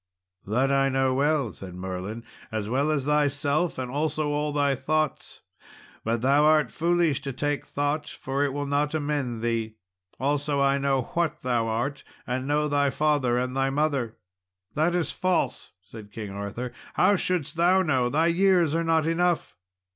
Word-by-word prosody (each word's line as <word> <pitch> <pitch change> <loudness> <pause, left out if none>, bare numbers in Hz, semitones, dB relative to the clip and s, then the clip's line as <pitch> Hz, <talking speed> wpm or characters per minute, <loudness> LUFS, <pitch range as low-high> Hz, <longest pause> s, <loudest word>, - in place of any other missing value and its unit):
"That 130 +6 +1 0.2
know 135 0 +2
I - - 0
well," 140 -3 +1
said 90 -2 -10
Merlin, 95 +5 -5 0.3
"as 110 -2 -3
well 135 +6 +1
as 145 -4 0
thyself, 150 +2 +1
and 125 -1 -4
also 150 +1 -1
all 150 0 -1
thy 145 -1 +2
thoughts; 155 +3 -2 0.6
but 115 0 -1
thou 140 +4 +4
art 155 -4 +4
foolish 170 -3 +1
to 140 - -4
take 145 +2 -2
thought, 145 +1 -1
for 135 +2 -2
it 145 - 0
will 145 +1 -3
not 145 +2 0
amend 145 -6 -2
thee. 115 -2 -1 0.4
Also 145 +1 0
I 140 0 +3
know 135 -2 +1
what 170 -2 -1
thou 120 -3 0
art, 120 +6 -2 0.2
and 130 +1 -3
know 150 +1 +1
thy 145 -1 +2
father 135 -3 +1
and 125 +1 -2
thy 135 0 +1
mother." 135 -5 -1 0.6
"That 160 +3 +1
is 175 -2 0
false," 185 -1 -1
said 105 +1 -12
King 105 -2 -6
Arthur; 100 +5 -5 0.2
"how 205 - +4
shouldst 170 -5 -1
thou 180 +3 +4
know? 130 -7 +1
thy 155 +5 +2
years 175 -2 +3
are 165 +1 +1
not 165 -1 +2
enough." 170 +1 0
145 Hz, 170 wpm, -26 LUFS, 125-155 Hz, 0.6 s, thou